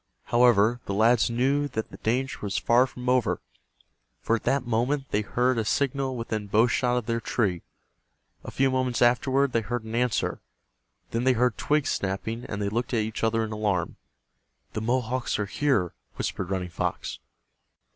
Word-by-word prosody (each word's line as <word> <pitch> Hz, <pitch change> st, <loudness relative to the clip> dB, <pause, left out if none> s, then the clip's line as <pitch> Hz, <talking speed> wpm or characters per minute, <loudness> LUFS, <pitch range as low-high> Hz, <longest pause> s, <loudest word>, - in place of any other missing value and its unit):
However, 120 Hz, -1 st, +4 dB
the 100 Hz, -, -2 dB
lads 115 Hz, +2 st, +4 dB
knew 135 Hz, +5 st, +1 dB
that 110 Hz, -5 st, -4 dB
the -, -, -10 dB
danger 130 Hz, +4 st, -1 dB
was 100 Hz, -1 st, -2 dB
far 120 Hz, +2 st, +4 dB
from 125 Hz, 0 st, -9 dB
over, 125 Hz, -2 st, +2 dB, 0.8 s
for 115 Hz, -, +1 dB
at -, -, -13 dB
that 140 Hz, -2 st, +1 dB
moment 125 Hz, +4 st, 0 dB
they 105 Hz, -, +2 dB
heard 125 Hz, +3 st, +1 dB
a -, -, +1 dB
signal 135 Hz, +2 st, 0 dB
within 110 Hz, -3 st, -3 dB
bow 105 Hz, +3 st, +4 dB
shot 125 Hz, +1 st, +1 dB
of 120 Hz, -, -2 dB
their 115 Hz, 0 st, -1 dB
tree. 95 Hz, -9 st, 0 dB, 0.8 s
A -, -, -7 dB
few 135 Hz, 0 st, +1 dB
moments 130 Hz, -2 st, +1 dB
afterward 130 Hz, +3 st, +3 dB
they 115 Hz, -, +1 dB
heard 120 Hz, +2 st, -3 dB
an 110 Hz, 0 st, -8 dB
answer. 120 Hz, -1 st, 0 dB, 0.7 s
Then 115 Hz, +1 st, -1 dB
they 130 Hz, 0 st, +4 dB
heard 125 Hz, -1 st, +2 dB
twigs 150 Hz, -1 st, +1 dB
snapping, 105 Hz, +5 st, -3 dB
and 100 Hz, -, -5 dB
they 100 Hz, -1 st, -1 dB
looked 120 Hz, +4 st, -2 dB
at 110 Hz, -, +2 dB
each 110 Hz, +1 st, -5 dB
other 115 Hz, 0 st, +2 dB
in 110 Hz, -, -4 dB
alarm. 105 Hz, -5 st, -1 dB, 0.8 s
"The 110 Hz, -, -3 dB
Mohawks 125 Hz, +2 st, 0 dB
are 105 Hz, -, -1 dB
here," 105 Hz, -, 0 dB, 0.2 s
whispered 95 Hz, -2 st, -3 dB
Running 95 Hz, -2 st, -2 dB
Fox. -, -, -3 dB
120 Hz, 175 wpm, -26 LUFS, 110-125 Hz, 0.8 s, However